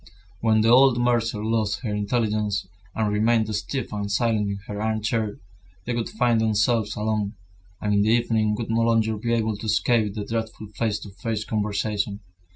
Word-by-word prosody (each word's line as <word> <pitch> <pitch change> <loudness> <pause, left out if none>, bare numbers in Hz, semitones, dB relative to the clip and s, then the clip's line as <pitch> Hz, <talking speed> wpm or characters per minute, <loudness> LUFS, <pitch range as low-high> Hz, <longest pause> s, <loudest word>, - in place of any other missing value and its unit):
When 110 -1 +3
the 115 - +3
old 130 0 +6
mercer 115 -3 +1
lost 110 -1 0
her 110 -5 -3
intelligence, 105 -2 0 0.3
and 105 -2 0
remained 110 0 +2
stiff 110 +5 -3
and 100 -1 -3
silent 105 -1 +1
in 100 - -3
her 105 0 -5
armchair, 110 0 -1 0.5
they 120 - -2
would 115 -1 -2
find 120 -2 +2
themselves 110 0 +1
alone, 105 -1 -1 0.4
and 105 0 0
in 100 - +4
the 105 - +2
evening 110 -2 +2
would 110 0 -4
no 115 +1 +2
longer 115 -1 +2
be 115 +3 -2
able 110 -2 0
to 110 - -6
escape 110 -1 +2
the 105 -2 -4
dreadful 110 -2 -4
face 105 0 -1
to 100 - -9
face 105 +3 -3
conversation. 105 -1 -1
110 Hz, 175 wpm, -24 LUFS, 105-115 Hz, 0.5 s, old